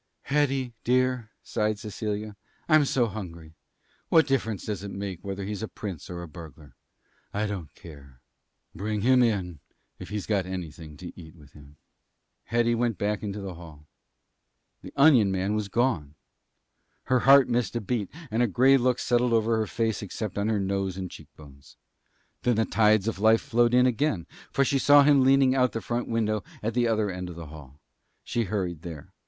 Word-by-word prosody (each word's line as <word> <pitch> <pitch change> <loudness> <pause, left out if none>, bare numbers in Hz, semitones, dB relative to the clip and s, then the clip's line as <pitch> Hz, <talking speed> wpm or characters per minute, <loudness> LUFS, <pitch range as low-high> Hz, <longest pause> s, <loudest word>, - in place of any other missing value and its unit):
"Hetty, 135 -3 0
dear," 125 -2 +1
sighed 105 0 -1
Cecilia, 105 0 -5 0.3
"I'm 155 -2 +5
so 130 -3 +2
hungry. 85 -7 -8 0.6
What 160 -1 +5
difference 115 -8 -1
does 105 -4 -3
it 100 - -5
make 95 -3 -6
whether 100 0 -5
he's 105 0 -4
a 110 - -3
prince 95 -5 -7
or 85 -1 -6
a - - -8
burglar? 75 -2 -12 0.6
I 105 +1 0
don't 95 -7 -5
care. 70 -5 -14 0.5
Bring 105 +3 -3
him 125 +3 +4
in 95 - 0 0.4
if - - -9
he's 105 -2 -4
got 100 -4 0
anything 80 -4 -7
to 90 - -9
eat 80 -1 -12
with 75 -4 -17
him." 75 0 -16 0.7
Hetty 120 +1 +1
went 115 -3 0
back 105 +1 -1
into 105 -1 -5
the 95 -2 -6
hall. 80 -3 -13 1.0
The - - -10
onion 130 -9 +5
man 95 +2 -1
was 105 -1 -1
gone. 100 - 0 0.9
Her 130 0 +2
heart 135 +1 +7
missed 120 -3 -1
a - - +1
beat, 105 -1 -2 0.2
and 115 +2 +1
a 120 - +4
gray 130 +7 +5
look 125 -1 +1
settled 120 -1 +1
over 115 0 +2
her 110 -1 -1
face 115 -2 -1
except 105 0 -5
on 100 +2 0
her 110 -2 +1
nose 95 -1 -2
and 95 -2 -5
cheek - - -12
bones. 70 -2 -16 0.7
And 120 -3 +2
then 110 - +2
the - - -17
tides 110 -1 +3
of 115 - -2
life 110 +2 +4
flowed 120 +1 +2
in 125 0 +5
again, 125 - 0 0.3
for 135 - +2
she 135 +1 +1
saw 145 +1 +7
him 140 -1 +5
leaning 135 0 +5
out 130 -1 +4
of 125 - -2
the 115 - -2
front 120 +1 -3
window 110 -3 0 0.2
at 115 +2 -1
the 120 -1 +2
other 110 -3 +1
end 90 -1 -5
of 85 - -8
the 85 -1 -8
hall. 70 -2 -13 0.4
She 115 -1 -1
hurried 90 -5 -3
there. 80 -5 -9
105 Hz, 190 wpm, -26 LUFS, 90-120 Hz, 1.0 s, heart